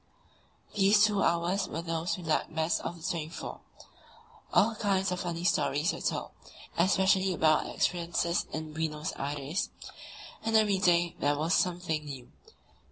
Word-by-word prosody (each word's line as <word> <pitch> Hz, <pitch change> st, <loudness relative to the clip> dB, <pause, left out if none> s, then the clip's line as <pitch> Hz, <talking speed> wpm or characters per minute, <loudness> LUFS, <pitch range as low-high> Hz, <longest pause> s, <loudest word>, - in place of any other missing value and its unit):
These 205 Hz, +1 st, +5 dB
two 205 Hz, -2 st, +1 dB
hours 175 Hz, +3 st, +1 dB
were 165 Hz, +2 st, -5 dB
those 165 Hz, +1 st, -2 dB
we 180 Hz, -, -9 dB
liked 160 Hz, 0 st, -1 dB
best 160 Hz, +1 st, +1 dB
of 175 Hz, -, -4 dB
the 165 Hz, +2 st, -5 dB
twenty 165 Hz, -4 st, -2 dB
four. -, -, -7 dB, 0.9 s
All 225 Hz, +2 st, +4 dB
kinds 195 Hz, -3 st, 0 dB
of 180 Hz, -, -2 dB
funny 170 Hz, -1 st, -3 dB
stories 150 Hz, -3 st, +1 dB
were -, -, -7 dB
told, -, -, -2 dB, 0.4 s
especially 190 Hz, +1 st, +3 dB
about 155 Hz, -3 st, +3 dB
experiences 170 Hz, 0 st, 0 dB
in 155 Hz, -1 st, -5 dB
Buenos 155 Hz, -1 st, -3 dB
Aires, 145 Hz, +4 st, -3 dB, 0.7 s
and 225 Hz, 0 st, -1 dB
every 205 Hz, -3 st, +3 dB
day 175 Hz, -2 st, +3 dB
there 145 Hz, 0 st, +1 dB
was 160 Hz, +4 st, 0 dB
something 175 Hz, -4 st, 0 dB
new. 135 Hz, -4 st, -9 dB
170 Hz, 150 wpm, -30 LUFS, 160-190 Hz, 0.9 s, These